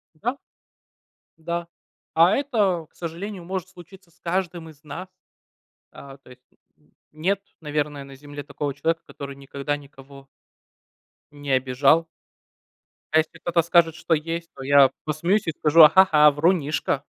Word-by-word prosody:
М-да. 240 Hz, -, -3 dB, 1.0 s
Да. 170 Hz, +1 st, -4 dB, 0.5 s
А 170 Hz, +5 st, +5 dB
это, 210 Hz, -, 0 dB
к -, -, -39 dB
сожалению, 175 Hz, +3 st, -6 dB
может 185 Hz, 0 st, -4 dB
случиться 185 Hz, 0 st, -16 dB
с 175 Hz, -, -31 dB
каждым 170 Hz, -2 st, -3 dB
из 150 Hz, -1 st, -18 dB
нас. 170 Hz, +5 st, -8 dB, 0.8 s
А, 135 Hz, -1 st, -12 dB
то 135 Hz, -, -21 dB
есть, 125 Hz, 0 st, -16 dB, 0.3 s
н 150 Hz, -, -32 dB, 0.2 s
нет, 185 Hz, +6 st, -1 dB, 0.2 s
наверное, 150 Hz, -2 st, -3 dB
на 135 Hz, 0 st, -12 dB
Земле 145 Hz, +1 st, -9 dB
такого 145 Hz, 0 st, -4 dB
человека, 165 Hz, +4 st, -1 dB
который 140 Hz, -1 st, -9 dB
никогда 140 Hz, +1 st, -4 dB
никого 140 Hz, -1 st, -15 dB, 1.0 s
не 145 Hz, -1 st, -6 dB
обижал. 135 Hz, +5 st, +2 dB, 1.1 s
А 155 Hz, -, +4 dB
если 160 Hz, +1 st, 0 dB
кто-то 170 Hz, 0 st, +1 dB
скажет, 170 Hz, -1 st, +3 dB
что 165 Hz, -, -1 dB
есть, 165 Hz, +2 st, -3 dB
то 135 Hz, -, -9 dB
я 140 Hz, -1 st, +6 dB
посмеюсь 170 Hz, +7 st, 0 dB
и -, -, +1 dB
скажу: 155 Hz, +1 st, +4 dB
"А 155 Hz, -, +11 dB
ха-ха, 160 Hz, -4 st, +6 dB
врунишка". 150 Hz, 0 st, 0 dB
160 Hz, 145 wpm, -23 LUFS, 145-175 Hz, 1.1 s, А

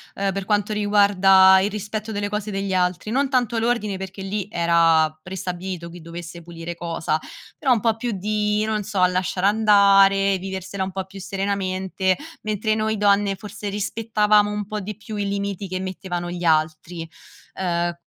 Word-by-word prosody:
uhm, 195 Hz, 0 st, 0 dB
per 195 Hz, -1 st, -4 dB
quanto 210 Hz, 0 st, 0 dB
riguarda 195 Hz, -2 st, +5 dB
il 200 Hz, +1 st, 0 dB
rispetto 215 Hz, +1 st, -4 dB
delle 205 Hz, 0 st, -2 dB
cose 210 Hz, 0 st, -3 dB
degli 195 Hz, -1 st, -2 dB
altri, 180 Hz, +2 st, 0 dB
non 270 Hz, +2 st, +1 dB
tanto 245 Hz, -3 st, +1 dB
l'ordine 225 Hz, -4 st, 0 dB
perché 190 Hz, +1 st, -7 dB
lì 195 Hz, 0 st, -3 dB
era 165 Hz, -2 st, +4 dB
prestabilito 180 Hz, -1 st, -5 dB
chi 175 Hz, 0 st, -11 dB
dovesse 170 Hz, +1 st, -8 dB
pulire 170 Hz, 0 st, -7 dB
cosa, 165 Hz, -2 st, -2 dB, 0.4 s
però 270 Hz, -, +1 dB
un 225 Hz, -, +1 dB
po' 225 Hz, 0 st, +1 dB
più 240 Hz, +1 st, -3 dB
di, 210 Hz, +1 st, 0 dB
non 215 Hz, -1 st, -1 dB
so, 200 Hz, -2 st, 0 dB
lasciar 180 Hz, 0 st, -1 dB
andare, 200 Hz, -2 st, +5 dB
viversela 190 Hz, +1 st, -5 dB
un 190 Hz, -, -4 dB
po' 190 Hz, 0 st, -4 dB
più 195 Hz, +1 st, -11 dB
serenamente, 190 Hz, -1 st, -1 dB, 0.3 s
mentre 215 Hz, 0 st, -1 dB
noi 220 Hz, 0 st, 0 dB
donne 200 Hz, -1 st, +3 dB
forse 205 Hz, +1 st, -7 dB
rispettavamo 210 Hz, 0 st, +1 dB
un 210 Hz, 0 st, -3 dB
po' 215 Hz, 0 st, -3 dB
di 210 Hz, +2 st, -6 dB
più 215 Hz, 0 st, -8 dB
i 205 Hz, -1 st, -2 dB
limiti 200 Hz, -1 st, -3 dB
che 185 Hz, 0 st, -3 dB
mettevano 185 Hz, -2 st, -4 dB
gli 175 Hz, 0 st, -5 dB
altri. 160 Hz, +1 st, 0 dB, 0.5 s
Uhm 175 Hz, -2 st, -1 dB
195 Hz, 170 wpm, -22 LUFS, 185-210 Hz, 0.5 s, riguarda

